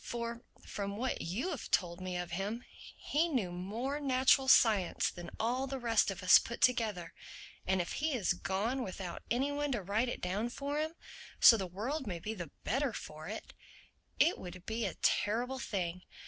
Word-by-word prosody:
For, 235 0 -4 0.2
from 200 0 -4
what 255 +3 -1
you 225 - -2
have 280 - -5
told 175 -1 +1
me 185 -1 -3
of 175 -1 -4
him, 205 +7 -3 0.3
he 315 +4 +1
knew 230 - 0
more 220 +11 -3
natural 265 -1 +4
science 215 -8 +4
than 175 -1 -8
all 250 +4 0
the 270 0 -3
rest 230 -4 +2
of 195 -2 -5
us 185 - +9
put 235 - -6
together; 215 -9 +1 0.5
and 190 0 +2
if 175 - -2
he 310 +1 -1
has 215 -8 +1
gone 205 +8 -1
without 185 -3 -6
any 265 +5 +1
one 290 0 -1
to 220 -5 -2
write 215 +6 0
it - - -4
down 200 +6 -1
for 285 +4 -3
him, 315 +2 -2 0.4
so 230 - +10
the 195 -4 -2
world 235 - -3
may 180 -4 -3
be 210 +6 -4
the 175 -7 -6
better 270 +1 0
for 155 -3 -8
it, 215 +3 -7 0.6
it 345 - +4
would 180 0 -9
be 225 +1 -1
a - - -5
terrible 245 +5 +1
thing. 180 -6 -3
220 Hz, 190 wpm, -33 LUFS, 185-260 Hz, 0.6 s, so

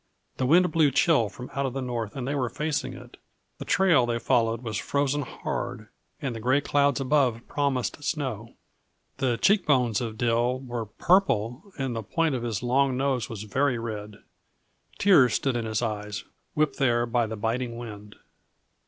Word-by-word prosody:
The 130 - 0
wind 175 +4 +5
blew 155 -3 +4
chill 135 - +3
from 125 +4 -10
out 140 -2 -1
the 135 - -3
north 120 -4 -4
and 130 -2 -4
they 140 - -1
were 130 -4 -1
facing 150 +1 -2
it; - - -13 0.4
the - - -6
trail 170 -11 +4
they 120 -1 0
followed 115 -1 +1
was 110 -4 -3
frozen 145 0 0
hard 135 - -5 0.3
and 135 -4 -3
the - - -5
gray 130 +5 +2
clouds 145 -1 +2
above 130 -4 +1
promised 140 -1 -1
snow. 130 -7 -3 0.6
The 125 -3 0
cheek 200 - +3
bones 125 -7 +2
of 110 -2 -4
Dill 120 +2 +1
were 120 -4 -5
purple 145 - +1
and 135 -3 -2
the 115 - -2
point 160 +8 0
of 125 - -2
his 115 -2 -3
long 130 +1 +2
nose 130 -4 0
was 110 -2 -6
very 130 +4 0
red. 105 -3 -6 0.7
Tears 140 - +5
stood 135 -3 0
in 120 -1 -1
his 110 +1 -1
eyes, 105 -2 -3 0.3
whipped 150 -3 +1
there 120 -3 +2
by 120 -1 0
the 110 0 -5
biting 115 +2 -2
wind. 105 -3 -9
125 Hz, 175 wpm, -26 LUFS, 115-140 Hz, 0.7 s, wind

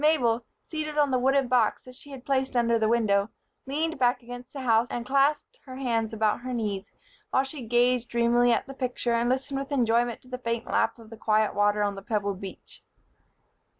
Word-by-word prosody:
Mabel, 245 -7 +3 0.2
seated 305 -1 -4
on 290 -2 +3
the 255 - +2
wooden 270 +1 +2
box 240 -3 +2
that 255 - -12
she 280 +3 -14
had 270 -2 -10
placed 265 -1 0
under 235 -1 +3
the 220 - +2
window, 215 -3 +2 0.4
leaned 315 +3 -2
back 250 0 +2
against 245 +1 -9
the 275 - -6
house 230 -1 +3
and 240 -1 -4
clasped 285 - +1
her 255 - -8
hands 230 -4 -1
about 215 -1 +1
her 255 +1 -5
knees, 205 -3 -3 0.4
while 265 - +2
she 275 +1 -7
gazed 240 +1 +2
dreamily 235 +1 +3
at 230 - +1
the 270 - -9
picture 250 -2 -2
and 235 +1 +1
listened 270 +2 -1
with 275 +1 -6
enjoyment 240 -3 +1
to - - -19
the 250 0 -6
faint 230 -1 -2
lap 225 +1 +1
of 225 -1 -15
the 225 - -9
quiet 215 -1 +2
water 205 +1 +2
on 205 0 0
the 195 - -8
pebbled 200 -2 -2
beach. 195 -1 -10
240 Hz, 210 wpm, -27 LUFS, 225-265 Hz, 0.4 s, Mabel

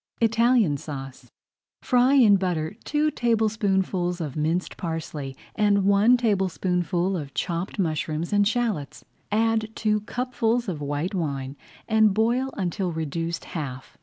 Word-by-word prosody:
ITALIAN 230 - +3
SAUCE 135 -3 -8 0.5
Fry 250 +1 +4
in 225 -7 +7
butter 175 -4 -2
two 300 +1 +1
tablespoonfuls 200 -7 0
of 150 -6 -4
minced 160 +4 -1
parsley 155 -5 -5 0.2
and 205 -2 +2
one 205 +5 +5
tablespoonful 185 -4 0
of 145 -5 -6
chopped 170 +2 -3
mushrooms 160 -1 -1
and 205 0 +4
shallots. 220 - -2 0.3
Add 220 0 +1
two 215 -1 +1
cupfuls 240 0 -1
of 165 -6 -4
white 145 +6 -2
wine 140 -6 -3 0.3
and 220 -3 +4
boil 240 +4 +1
until 185 -1 -1
reduced 165 +1 -3
half. 135 -5 -6
190 Hz, 125 wpm, -25 LUFS, 160-220 Hz, 0.5 s, in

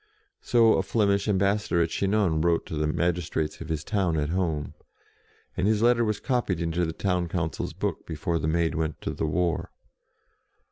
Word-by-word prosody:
So 115 -2 +4
a - - +3
Flemish 100 -3 +1
ambas 100 +1 +2
sador 85 -1 +2
at 80 - -3
Chinon 100 -5 +1
wrote 85 0 +2
to - - -6
the 75 0 0
magistrates 85 -1 -1
of 80 - -7
his 80 -2 -2
town 95 -4 0
at 75 -1 0
home, 80 -4 -1 0.8
and 95 - 0
his 110 0 +2
letter 120 0 +4
was 105 -2 -1
copied 120 - -1
into 85 +1 0
the 80 - -2
town 90 0 -1
council's 85 -2 -3
book, - - -3
before 80 +1 -2
the 75 - -2
Maid 85 +1 +1
went 80 -1 -2
to - - -3
the 80 - -2
war. 85 +2 0
85 Hz, 185 wpm, -26 LUFS, 80-100 Hz, 0.8 s, So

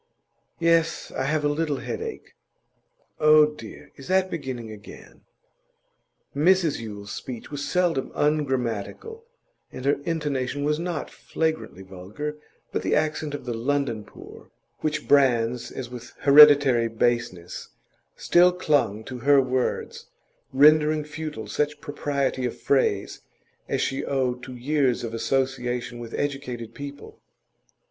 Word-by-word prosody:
'Yes; 165 -1 +1
I 130 - -1
have 150 +1 0
a - - +4
little 145 -1 -1
headache.' 450 - -6 0.9
'Oh, 155 0 +7
dear! 150 -8 -9
Is 135 - -11
that 185 0 +2
beginning 130 -8 -5
again?' 105 -1 -13 1.1
Mrs 170 +1 +3
Yule's 100 -3 -8
speech 125 0 -7
was 145 0 -4
seldom 175 -7 0
ungrammatical, 145 - -1 0.5
and 130 - -8
her 140 0 +2
intonation 145 -4 -2
was 150 +1 0
not 170 -1 -4
flagrantly 160 - -3
vulgar, 95 +11 -6 0.4
but - - -1
the - - +1
accent 155 -1 -1
of 135 - -8
the 120 - -3
London 120 -2 -1
poor, - - -14 0.3
which 155 0 -2
brands 125 -4 +3
as 125 -2 -7
with 120 -1 -9
hereditary 140 -4 +7
baseness, 115 -6 -2 0.5
still 180 +1 +4
clung 145 - 0
to 125 +1 -7
her 140 +3 +5
words, 130 -1 -2 0.4
rendering 150 +2 +5
futile 150 -5 -6
such 150 +7 -2
propriety 140 -3 -2
of 125 - -3
phrase 105 -8 0 0.5
as - - 0
she 135 - -1
owed 125 -2 -1
to 130 0 -9
years 130 -1 0
of 115 -1 -5
association 125 -1 -1
with 115 -1 -7
educated 135 -5 -4
people. 140 0 -9
140 Hz, 125 wpm, -25 LUFS, 120-150 Hz, 1.1 s, Oh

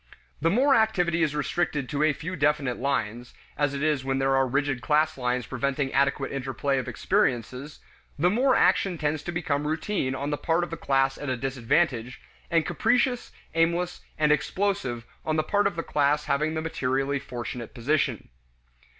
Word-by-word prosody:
The 165 - +3
more 265 +9 +4
activity 180 -8 +2
is 150 -2 +1
restricted 150 -2 -1
to 145 -1 -1
a 155 0 +4
few 165 +6 -5
definite 145 -5 +1
lines 120 -3 -2 0.2
as 145 -1 0
it 140 - -3
is 150 -4 +1
when 135 0 -1
there 135 0 +2
are 135 0 +3
rigid 140 -1 0
class 155 +5 +2
lines 125 -1 -1
preventing 135 +1 -2
adequate 140 0 +1
interplay 135 0 -1
of 125 - -5
experiences 125 +5 -1 0.4
the 175 +5 +3
more 255 +5 +3
action 185 -3 +3
tends 150 -1 -1
to 175 - -5
become 150 -4 -1
routine 155 -3 -1
on 140 +2 -3
the 145 - -2
part 165 +1 +1
of 175 - -5
the - - -2
class 135 -3 +1
at 145 - -4
a 130 - -1
disadvantage, 125 0 0 0.3
and 165 -2 +2
capricious, 245 - +1 0.2
aimless, 170 +2 +1 0.2
and 150 -1 +3
explosive 150 - 0 0.2
on 155 - -1
the 155 - +2
part 205 +5 +2
of 200 - -3
the 165 - -3
class 150 0 +1
having 150 +3 0
the 160 - -2
materially 135 -2 -1
fortunate 120 -2 -6
position. 140 +5 0
145 Hz, 175 wpm, -26 LUFS, 135-165 Hz, 0.4 s, more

